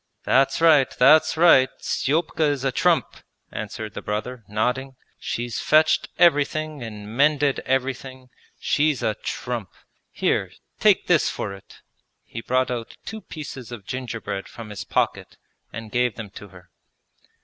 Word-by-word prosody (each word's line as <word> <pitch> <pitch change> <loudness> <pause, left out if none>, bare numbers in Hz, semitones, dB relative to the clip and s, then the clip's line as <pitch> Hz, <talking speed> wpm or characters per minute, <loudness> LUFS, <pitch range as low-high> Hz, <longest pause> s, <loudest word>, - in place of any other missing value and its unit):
'That's 135 +1 +3
right, 155 -5 +6
that's 155 +2 +5
right, 160 -6 +6
Stepka 155 +2 0
is 145 -3 0
a 135 - +1
trump!' - - +1 0.3
answered - - -6
the - - -6
brother, 110 +3 -4
nodding. 125 +5 -1 0.2
'She's 120 -1 -3
fetched 155 +1 +3
everything 155 -2 +2
and 105 -1 -8
mended 145 0 +3
everything, 130 0 -2 0.3
she's 150 -2 +1
a 110 - +1
trump! 120 -6 -4 0.4
Here, - - -1 0.3
take - - +4
this - - +3
for 100 - -4
it!' 100 - -15 0.4
He 115 - -8
brought 130 +2 0
out 120 -2 -5
two 220 0 -6
pieces 135 - -8
of 110 -5 -8
gingerbread 115 -6 -5
from 115 -2 -10
his 105 +1 -6
pocket - - -1 0.3
and 110 -1 -8
gave 125 -1 +1
them 110 -4 -8
to 105 - -11
her. 90 -2 -17
130 Hz, 140 wpm, -23 LUFS, 110-145 Hz, 0.4 s, right